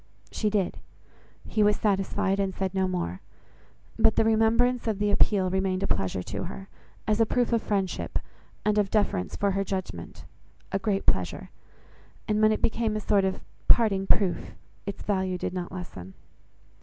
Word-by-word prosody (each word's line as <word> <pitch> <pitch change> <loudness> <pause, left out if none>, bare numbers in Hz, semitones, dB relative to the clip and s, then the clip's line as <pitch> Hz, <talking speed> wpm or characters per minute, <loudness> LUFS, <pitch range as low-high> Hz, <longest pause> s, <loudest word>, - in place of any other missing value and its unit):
She 215 - 0
did: 200 -3 -1 0.7
he 215 - 0
was 210 0 +5
satisfied, 195 -1 0
and 195 -1 -1
said 190 -1 -2
no 190 -1 +1
more. 95 - -3 0.8
But 225 0 +4
the - - +4
remembrance 230 +3 +3
of 215 -3 0
the 205 0 +1
appeal 195 -3 +3
remained 190 0 0
a - - +1
pleasure 95 -1 -1
to - - -4
her, 195 +2 -8 0.4
as 215 +1 +2
a - - +6
proof 245 0 +1
of 230 - +3
friendship, 195 -4 -1 0.5
and 210 0 +3
of 200 -1 +1
deference 195 - 0
for 200 -1 +1
her 195 +1 0
judgement, 185 - -5 0.5
a 195 - 0
great 195 0 -1
pleasure; 95 -1 0 0.8
and 210 0 +1
when 215 0 +6
it 215 - -1
became 225 -1 +1
a - - 0
sort 205 -2 +2
of 190 - -2 0.3
parting 195 -5 +4
proof, 195 -4 +1 0.3
its 200 - -5
value 190 -2 0
did 180 - -3
not 180 -1 -4
lessen. 95 - -8
195 Hz, 170 wpm, -27 LUFS, 185-215 Hz, 0.8 s, a